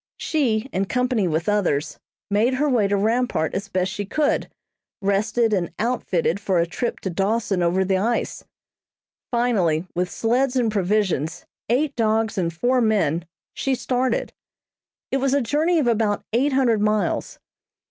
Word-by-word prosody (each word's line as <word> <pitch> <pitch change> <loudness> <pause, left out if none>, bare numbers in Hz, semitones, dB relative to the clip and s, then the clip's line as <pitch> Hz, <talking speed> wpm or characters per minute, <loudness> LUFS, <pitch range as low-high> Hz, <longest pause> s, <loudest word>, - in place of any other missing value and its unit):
She, 250 -7 0
in 195 +1 0
company 250 -3 0
with 165 +2 -1
others, 170 -8 0 0.3
made 225 +6 +2
her 295 +3 +1
way 235 -7 +2
to 200 0 +1
Rampart 225 -5 0
as 195 +1 -3
best 185 -1 -1
she 205 - -3
could, 290 +9 0 0.5
rested 215 +3 +1
and 180 -4 0
"outfitted" 200 -7 0
for 195 -2 0
a 170 - +3
trip 235 +8 -3
to 190 - -3
Dawson 195 +1 0
over 180 +2 +2
the 190 0 +1
ice. 235 +4 -1 0.9
Finally, 195 -10 +1
with 180 +1 -1
sleds 245 +3 0
and 240 -4 +2
provisions, 185 -5 0 0.2
eight 280 +4 +1
dogs 220 -1 +1
and 170 -2 0
four 245 +10 +1
men, 175 -8 +1 0.3
she 270 -1 -1
started. 255 +1 -1 0.8
It 270 - +2
was 270 0 +1
a - - +3
journey 305 +8 +1
of 300 - +2
about 220 -3 +1
eight 270 +4 +2
hundred 240 -5 +2
miles. 210 0 0
215 Hz, 155 wpm, -23 LUFS, 190-245 Hz, 0.9 s, a